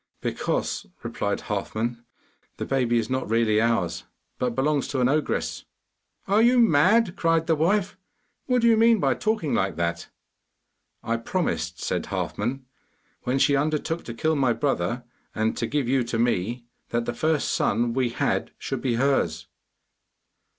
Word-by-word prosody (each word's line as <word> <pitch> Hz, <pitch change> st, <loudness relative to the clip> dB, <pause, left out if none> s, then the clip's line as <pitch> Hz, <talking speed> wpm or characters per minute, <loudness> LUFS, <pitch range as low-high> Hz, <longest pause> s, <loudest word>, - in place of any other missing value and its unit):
'Because,' -, -, -2 dB, 0.2 s
replied -, -, -2 dB
Halfman, 115 Hz, +2 st, -3 dB, 0.5 s
'the -, -, -3 dB
baby 125 Hz, -3 st, +1 dB
is 115 Hz, -1 st, 0 dB
not 130 Hz, -3 st, -2 dB
really 110 Hz, -1 st, +3 dB
ours, 115 Hz, -7 st, 0 dB, 0.3 s
but 125 Hz, -2 st, -1 dB
belongs 145 Hz, +2 st, +1 dB
to 135 Hz, -, -2 dB
an 125 Hz, -, +3 dB
ogress.' 150 Hz, +2 st, -1 dB, 0.6 s
'Are 205 Hz, +3 st, +4 dB
you 245 Hz, +2 st, +5 dB
mad?' 205 Hz, 0 st, +4 dB
cried 165 Hz, -2 st, +2 dB
the 165 Hz, -, +2 dB
wife. 190 Hz, +4 st, +1 dB, 0.5 s
'What 250 Hz, -2 st, +2 dB
do -, -, +5 dB
you 225 Hz, -1 st, +5 dB
mean 225 Hz, 0 st, +5 dB
by 135 Hz, -5 st, +2 dB
talking 215 Hz, -9 st, -1 dB
like 95 Hz, 0 st, 0 dB
that?' 85 Hz, 0 st, -2 dB, 0.9 s
'I 115 Hz, 0 st, 0 dB
promised,' 85 Hz, -, -2 dB
said -, -, -2 dB
Halfman, 125 Hz, +6 st, -3 dB, 0.6 s
'when 125 Hz, +2 st, +1 dB
she 140 Hz, +1 st, +4 dB
undertook 155 Hz, +3 st, -1 dB
to 115 Hz, -, -6 dB
kill 160 Hz, +6 st, +1 dB
my 130 Hz, -4 st, +2 dB
brother 120 Hz, -3 st, -1 dB, 0.3 s
and 110 Hz, +1 st, 0 dB
to 115 Hz, -, -1 dB
give 145 Hz, -2 st, -1 dB
you 130 Hz, 0 st, +2 dB
to 115 Hz, -, -2 dB
me, 120 Hz, +1 st, 0 dB, 0.2 s
that 120 Hz, 0 st, -1 dB
the 120 Hz, -, -2 dB
first 155 Hz, +4 st, 0 dB
son 115 Hz, +2 st, +1 dB
we 130 Hz, -1 st, +1 dB
had 115 Hz, -, -1 dB
should -, -, -4 dB
be 125 Hz, -3 st, 0 dB
hers. 135 Hz, +3 st, +1 dB
130 Hz, 155 wpm, -25 LUFS, 115-160 Hz, 0.9 s, you